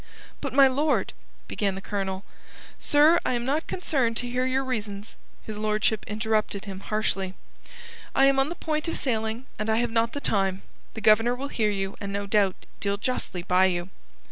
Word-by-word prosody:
"But, -, -, -3 dB
my 275 Hz, 0 st, +7 dB
lord..." 290 Hz, +3 st, +1 dB, 0.3 s
began 200 Hz, -2 st, -1 dB
the -, -, -5 dB
Colonel. 195 Hz, -1 st, -3 dB, 0.5 s
"Sir, 305 Hz, +4 st, +5 dB
I -, -, 0 dB
am 240 Hz, -1 st, -1 dB
not 295 Hz, +5 st, 0 dB
concerned 265 Hz, -10 st, 0 dB
to 245 Hz, -, 0 dB
hear 250 Hz, +1 st, 0 dB
your 265 Hz, +1 st, +1 dB
reasons," 210 Hz, -4 st, -4 dB, 0.3 s
his 215 Hz, -1 st, -6 dB
lordship 215 Hz, 0 st, +1 dB
interrupted 215 Hz, -1 st, -1 dB
him 195 Hz, -2 st, -6 dB
harshly. 195 Hz, -3 st, -1 dB, 0.8 s
"I 270 Hz, -, +6 dB
am 275 Hz, 0 st, +4 dB
on 270 Hz, +2 st, +2 dB
the 345 Hz, -, -4 dB
point 310 Hz, -1 st, -2 dB
of 330 Hz, -, -1 dB
sailing 225 Hz, -1 st, -2 dB
and 215 Hz, +1 st, -2 dB
I 220 Hz, -, +3 dB
have 235 Hz, 0 st, +1 dB
not 230 Hz, 0 st, +1 dB
the 285 Hz, -, -3 dB
time. 195 Hz, -6 st, 0 dB, 0.3 s
The 220 Hz, -, -5 dB
Governor 225 Hz, +3 st, +5 dB
will 275 Hz, +3 st, -5 dB
hear 215 Hz, -5 st, +1 dB
you, 195 Hz, -1 st, -3 dB
and 200 Hz, -1 st, -4 dB
no 200 Hz, 0 st, -2 dB
doubt 200 Hz, -2 st, +2 dB, 0.2 s
deal 200 Hz, 0 st, 0 dB
justly 205 Hz, -6 st, -3 dB
by 185 Hz, +1 st, +4 dB
you." 175 Hz, -1 st, -1 dB
220 Hz, 190 wpm, -26 LUFS, 200-260 Hz, 0.8 s, my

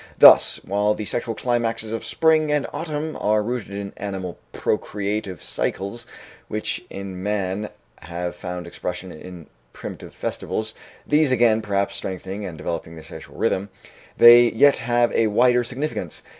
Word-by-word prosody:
Thus, -, -, +8 dB
while 105 Hz, +2 st, +1 dB
the 105 Hz, -, -5 dB
sexual 115 Hz, +1 st, -2 dB
climaxes 115 Hz, -2 st, -1 dB
of 115 Hz, -, -3 dB
spring 160 Hz, -2 st, +2 dB
and 150 Hz, -2 st, +1 dB
autumn 155 Hz, 0 st, -4 dB
are 105 Hz, 0 st, +2 dB
rooted 120 Hz, 0 st, -3 dB
in 100 Hz, -1 st, -5 dB
animal 95 Hz, -3 st, -5 dB
procreative 100 Hz, -, -2 dB
cycles 100 Hz, +5 st, -3 dB, 0.4 s
which -, -, -2 dB
in 95 Hz, -2 st, -7 dB
man 105 Hz, 0 st, -2 dB, 0.3 s
have 85 Hz, +1 st, -5 dB
found 90 Hz, 0 st, -6 dB
expression 90 Hz, +1 st, -5 dB
in 85 Hz, +1 st, -10 dB, 0.3 s
primitive -, -, -9 dB
festivals 110 Hz, 0 st, -3 dB, 0.3 s
these, 150 Hz, -2 st, +3 dB
again, 115 Hz, -3 st, +4 dB
perhaps, 100 Hz, -2 st, -1 dB
strengthening 95 Hz, +2 st, -5 dB
and 85 Hz, -3 st, -8 dB
developing 80 Hz, +1 st, -5 dB
the 80 Hz, -, -10 dB
sexual 75 Hz, -, -11 dB
rhythm 100 Hz, +2 st, 0 dB, 0.5 s
they 120 Hz, 0 st, +9 dB
yet 140 Hz, +5 st, +5 dB
have 120 Hz, 0 st, +1 dB
a 115 Hz, -, +2 dB
wider 120 Hz, +3 st, +4 dB
significance. 135 Hz, +6 st, -4 dB
105 Hz, 145 wpm, -23 LUFS, 95-120 Hz, 0.5 s, they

